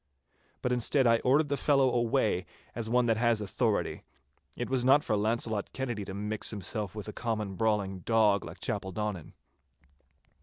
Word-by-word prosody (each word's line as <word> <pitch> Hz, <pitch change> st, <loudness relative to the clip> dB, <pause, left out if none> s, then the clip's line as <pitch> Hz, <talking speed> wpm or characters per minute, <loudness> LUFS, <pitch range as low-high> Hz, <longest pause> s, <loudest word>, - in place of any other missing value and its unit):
But 125 Hz, -, 0 dB
instead 125 Hz, +2 st, +2 dB
I 115 Hz, -1 st, +5 dB
ordered 140 Hz, +5 st, +3 dB
the 140 Hz, -, +1 dB
fellow 135 Hz, -1 st, +3 dB
away 115 Hz, -, +1 dB, 0.3 s
as 115 Hz, -2 st, -4 dB
one 125 Hz, +1 st, +3 dB
that 115 Hz, -2 st, +2 dB
has 120 Hz, -1 st, +2 dB
authority. 105 Hz, +1 st, -1 dB, 0.6 s
It -, -, -2 dB
was 130 Hz, -2 st, 0 dB
not 135 Hz, +3 st, +5 dB
for 110 Hz, -, 0 dB
Launcelot 110 Hz, 0 st, -1 dB
Kennedy 120 Hz, -6 st, -3 dB
to 95 Hz, -, -7 dB
mix 105 Hz, +1 st, -2 dB
himself 105 Hz, 0 st, -4 dB
with 105 Hz, -1 st, -6 dB
a 105 Hz, -, -6 dB
common 110 Hz, -4 st, -3 dB
brawling 100 Hz, -2 st, 0 dB
dog 105 Hz, -1 st, +3 dB
like -, -, -9 dB
Chapeldonnan. 95 Hz, -2 st, -4 dB
110 Hz, 160 wpm, -30 LUFS, 105-125 Hz, 0.6 s, I